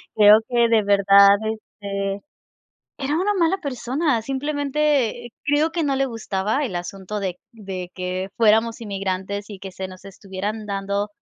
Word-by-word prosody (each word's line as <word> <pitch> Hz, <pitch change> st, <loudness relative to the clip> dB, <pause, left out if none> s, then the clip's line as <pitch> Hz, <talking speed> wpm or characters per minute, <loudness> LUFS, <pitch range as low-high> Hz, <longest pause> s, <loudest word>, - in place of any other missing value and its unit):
Creo 210 Hz, 0 st, +8 dB
que 235 Hz, -1 st, +3 dB
de 225 Hz, -2 st, +4 dB
verdad, 200 Hz, 0 st, +6 dB
este 200 Hz, -2 st, -4 dB, 0.8 s
era 285 Hz, +1 st, -1 dB
una 390 Hz, +4 st, +1 dB
mala 355 Hz, +1 st, +2 dB
persona. 275 Hz, -3 st, -1 dB
Simplemente 280 Hz, -2 st, 0 dB, 0.2 s
creo 295 Hz, +2 st, +2 dB
que 335 Hz, 0 st, -1 dB
no 275 Hz, -2 st, +1 dB
le 270 Hz, -, +2 dB
gustaba 220 Hz, +2 st, -2 dB
el 200 Hz, -9 st, -3 dB
asunto 195 Hz, +3 st, -5 dB
de 185 Hz, -2 st, -3 dB
de 190 Hz, -5 st, -7 dB
que 185 Hz, +1 st, -3 dB
fuéramos 225 Hz, +1 st, +3 dB
inmigrantes 200 Hz, -1 st, -3 dB
y 200 Hz, -, -8 dB
que 190 Hz, 0 st, -8 dB
se 190 Hz, +1 st, -6 dB
nos 185 Hz, +1 st, -13 dB
estuvieran 200 Hz, +2 st, -6 dB
dando 200 Hz, 0 st, -2 dB
210 Hz, 150 wpm, -22 LUFS, 195-265 Hz, 0.8 s, Creo